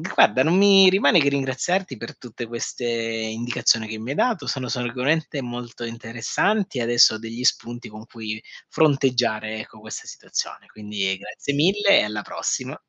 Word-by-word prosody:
guarda, 130 Hz, +5 st, +5 dB
non 165 Hz, +7 st, +3 dB
mi 195 Hz, -1 st, +7 dB
rimane 185 Hz, -2 st, +4 dB
che 140 Hz, -1 st, +3 dB
ringraziarti 140 Hz, +5 st, -1 dB
per 115 Hz, -, -9 dB
tutte 120 Hz, -1 st, -8 dB
queste 120 Hz, +1 st, -5 dB
indicazioni 115 Hz, 0 st, 0 dB
che 110 Hz, 0 st, -6 dB
mi 115 Hz, +4 st, -7 dB
hai -, -, -3 dB
dato, 230 Hz, -2 st, 0 dB
sono 130 Hz, -2 st, -3 dB
sicuramente 135 Hz, +4 st, -1 dB
molto 120 Hz, 0 st, -7 dB
interessanti, 115 Hz, -, -2 dB
e -, -, 0 dB
adesso 120 Hz, 0 st, +5 dB
ho 110 Hz, -, -7 dB
degli 115 Hz, +2 st, -7 dB
spunti 120 Hz, -2 st, -1 dB
con 110 Hz, +1 st, -11 dB
cui 110 Hz, -1 st, -6 dB, 0.3 s
fronteggiare, 125 Hz, -7 st, +1 dB
ecco, 110 Hz, -, -11 dB
questa 110 Hz, 0 st, -8 dB
situazione, -, -, -5 dB
quindi 105 Hz, -3 st, -3 dB
grazie 145 Hz, -, -5 dB
mille 195 Hz, +7 st, +4 dB
e -, -, +2 dB
alla 105 Hz, -1 st, -4 dB
prossima. -, -, -3 dB
120 Hz, 165 wpm, -23 LUFS, 110-140 Hz, 0.3 s, mi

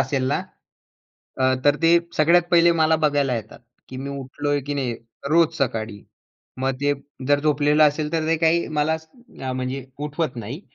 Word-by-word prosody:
असेल 135 Hz, -3 st, 0 dB
ना 145 Hz, -, 0 dB, 1.0 s
अ, -, -, +3 dB, 0.2 s
तर 145 Hz, 0 st, +4 dB
ते 165 Hz, -, +5 dB, 0.3 s
सगळ्यात 170 Hz, +3 st, +5 dB
पहिले 170 Hz, 0 st, +6 dB
मला 160 Hz, 0 st, +4 dB
बघायला 145 Hz, -4 st, +2 dB
येतात, 115 Hz, +1 st, -8 dB, 0.3 s
की 130 Hz, -, -8 dB
मी 140 Hz, +1 st, -5 dB
उठलोय 140 Hz, +1 st, -3 dB
की 145 Hz, -, -2 dB
नाही 130 Hz, -4 st, -2 dB, 0.4 s
रोज 165 Hz, 0 st, +4 dB
सकाळी. 110 Hz, -6 st, -2 dB, 0.6 s
मग 135 Hz, 0 st, +1 dB
ते 145 Hz, 0 st, +2 dB, 0.4 s
जर 145 Hz, 0 st, +4 dB
झोपलेलं 150 Hz, 0 st, +3 dB
असेल, 150 Hz, +1 st, 0 dB
तर 160 Hz, -1 st, 0 dB
ते 165 Hz, -, +3 dB
काही 165 Hz, +1 st, +2 dB
मला 160 Hz, +2 st, +2 dB, 0.6 s
म्हणजे 130 Hz, +1 st, -4 dB, 0.2 s
उठवत 150 Hz, -3 st, -3 dB
नाही 120 Hz, -, -6 dB
145 Hz, 160 wpm, -22 LUFS, 130-160 Hz, 1.0 s, पहिले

